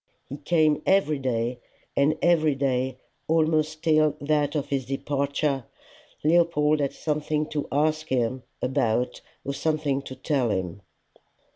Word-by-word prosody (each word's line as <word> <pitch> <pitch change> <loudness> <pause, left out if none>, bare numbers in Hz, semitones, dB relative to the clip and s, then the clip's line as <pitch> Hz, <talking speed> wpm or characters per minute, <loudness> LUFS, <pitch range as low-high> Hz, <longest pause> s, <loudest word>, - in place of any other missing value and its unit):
He 140 - -7
came 155 0 +2
every 190 -7 +3
day, 120 -1 -1 0.4
and 150 +3 +3
every 160 -4 +3
day, 130 -1 -1 0.3
almost 155 -1 +1
till 155 -2 +3
that 150 0 0
of 145 -2 -2
his 135 -2 -1
departure, 140 0 -1 0.6
Leopold 155 -2 +3
had 140 -2 -1
something 150 0 -1
to 150 -2 -3
ask 155 +2 +1
him 130 -1 0 0.2
about 125 -2 0 0.2
or 140 - -2
something 150 -2 0
to 130 -1 -9
tell 130 -3 0
him. 95 -1 -3
145 Hz, 130 wpm, -25 LUFS, 130-155 Hz, 0.6 s, every